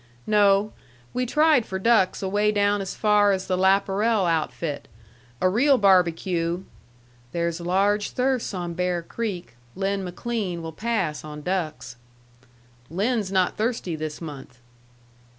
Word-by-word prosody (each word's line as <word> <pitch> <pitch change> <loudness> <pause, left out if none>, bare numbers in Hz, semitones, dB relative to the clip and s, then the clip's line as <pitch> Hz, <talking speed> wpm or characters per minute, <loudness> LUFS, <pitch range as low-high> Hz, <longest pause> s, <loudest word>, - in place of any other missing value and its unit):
"No. 205 0 +3 0.4
We 250 0 -1
tried 300 -1 +4
for 190 - -5
ducks 190 -2 +2
away 205 +2 +1
down 205 -1 +1
as 190 - -5
far 210 -1 +4
as 190 -1 -1
the 185 - 0
Laparel 195 +3 +2
outfit. 160 -2 -2 0.5
A - - +3
real 260 +9 +4
barbecue 180 -3 +2 0.3
" 120 0 -31
"There's 170 0 -2
large 200 +4 +1
thirsts 255 -1 -1
on 175 -3 -4
Bear 180 0 -1
Creek. 195 - -5 0.2
Lin 195 +1 -1
McLean 185 -2 -4
will 160 - -5
pass 215 -6 -2
on 150 -1 -8
ducks." 155 -9 -3 0.9
"Lin's 205 - -1
not 185 -2 +1
thirsty 220 -6 -1
this 155 -1 -5
month." 140 -6 -9
190 Hz, 135 wpm, -24 LUFS, 170-210 Hz, 0.9 s, tried